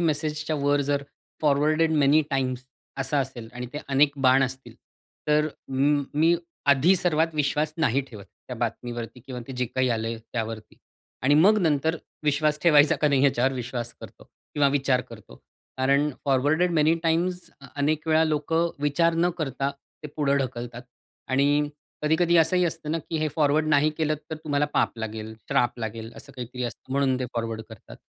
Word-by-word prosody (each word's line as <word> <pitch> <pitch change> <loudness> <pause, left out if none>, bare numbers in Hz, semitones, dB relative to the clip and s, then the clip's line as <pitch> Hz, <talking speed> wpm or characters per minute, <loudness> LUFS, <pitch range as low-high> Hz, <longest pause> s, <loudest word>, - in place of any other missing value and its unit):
मेसेजच्या 155 -1 -1
वर 145 0 +2
जर 140 0 +1 0.4
forwarded 155 +2 +3
many 150 0 +4
times 130 -2 -1 0.3
असं 135 +2 0
असेल 125 -4 -5
आणि 125 0 -6
ते 150 - -4
अनेक 140 +1 +4
बाण 130 +1 +5
असतील, 130 0 -4 0.5
तर 150 +1 +3 0.2
म 140 +2 +2
मी 160 +3 +4 0.4
आधी 145 +8 +4
सर्वात 165 -2 +1
विश्वास 150 +1 0
नाही 140 -5 +2
ठेवत 105 -5 -11
त्या 125 +4 -11
बातमीवरती 120 +1 -4
किंवा 125 +1 -8
ते - - -5
जे 125 - 0
काही 130 +2 0
आलंय 115 0 -2 0.2
त्यावरती 110 -2 -5 0.5
आणि 140 +3 +4
मग 195 +8 +5
नंतर 160 +1 +1 0.3
विश्वास 150 +1 +1
ठेवायचा 150 -3 +5
का 150 - +2
नाही? 140 -1 +3
याच्यावर 135 -1 +2
विश्वास 120 -2 -4
करतो - - -12 0.3
किंवा 145 -1 +4
विचार 135 -2 +1
करतो. 105 - -13 0.4
कारण 140 +3 +2
फॉरवर्डेड 145 +6 +2
मेनी 155 0 +3
टाइम्स, 175 +2 0 0.3
अनेक 150 +2 0
वेळा 160 0 +4
लोकं 160 +2 0
विचार 165 +3 +2
न 175 +2 +2
करता 135 -2 -2
ते 140 +2 -13
पुढं 140 -2 +2
ढकलतात 120 -2 -4 0.5
आणि 145 +2 +2 0.3
कधी-कधी 165 +3 +3
असंही 170 +3 +4
असतं 160 -2 -3
ना 165 - 0
की 165 - -5
हे 155 - 0
फॉरवर्ड 155 +1 +2
नाही 150 +1 +4
केलंत, 155 -1 +1
तर - - -2
तुम्हाला 145 -1 +1
पाप 115 - +1
लागेल, 110 0 -5
श्राप 120 0 +1
लागेल, 115 0 -5
असं 140 - -11
काहीतरी 125 -1 -6
असतं, 120 +2 -7
म्हणून 135 -2 +1
ते 125 - 0
फॉरवर्ड 115 -1 -3
करतात. 110 -3 -13
140 Hz, 165 wpm, -25 LUFS, 125-155 Hz, 0.5 s, बाण